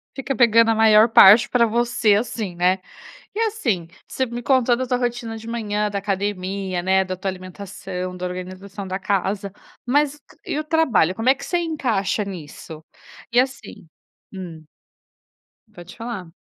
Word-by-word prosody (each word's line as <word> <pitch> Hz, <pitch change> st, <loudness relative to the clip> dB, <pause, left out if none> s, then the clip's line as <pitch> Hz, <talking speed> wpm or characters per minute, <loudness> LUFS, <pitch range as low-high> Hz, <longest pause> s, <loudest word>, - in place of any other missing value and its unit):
Fica 270 Hz, 0 st, -3 dB
pegando 230 Hz, -1 st, +5 dB
a -, -, +1 dB
maior 220 Hz, 0 st, +6 dB
parte 225 Hz, +2 st, +8 dB
para 240 Hz, -2 st, +3 dB
você 235 Hz, -2 st, +2 dB
assim, 210 Hz, -4 st, -3 dB
né? 180 Hz, +2 st, +2 dB, 0.6 s
E -, -, -3 dB
assim 265 Hz, -, -1 dB, 0.2 s
você 260 Hz, -, -1 dB
me 240 Hz, 0 st, -6 dB
contou 255 Hz, -2 st, +3 dB
a 255 Hz, +1 st, -3 dB
tua 250 Hz, -1 st, +1 dB
rotina 240 Hz, -2 st, -3 dB
de 225 Hz, +1 st, -11 dB
manhã 210 Hz, -2 st, -2 dB
da 200 Hz, -1 st, -3 dB
academia, 195 Hz, -2 st, -3 dB
né. 190 Hz, +1 st, +2 dB
Da 185 Hz, 0 st, -4 dB
tua 190 Hz, +1 st, -3 dB
alimentação, 185 Hz, 0 st, -7 dB
da 180 Hz, -, -4 dB
organização 185 Hz, +2 st, -7 dB
da 190 Hz, +1 st, -3 dB
casa, 200 Hz, 0 st, -1 dB, 0.3 s
mas 290 Hz, +3 st, +1 dB, 0.3 s
e 300 Hz, -, -2 dB
o -, -, -3 dB
trabalho? 305 Hz, -, +2 dB
Como 225 Hz, +4 st, +1 dB
é 270 Hz, -, +5 dB
que -, -, -9 dB
você 350 Hz, -, 0 dB
encaixa 235 Hz, -, -1 dB
nisso 160 Hz, -3 st, -9 dB, 0.5 s
e 240 Hz, -, +4 dB
assim 260 Hz, -9 st, -3 dB, 0.5 s
hum. 175 Hz, -4 st, -8 dB, 1.1 s
Pode 175 Hz, -1 st, -12 dB
falar. 230 Hz, -6 st, -6 dB
210 Hz, 160 wpm, -22 LUFS, 185-240 Hz, 1.1 s, parte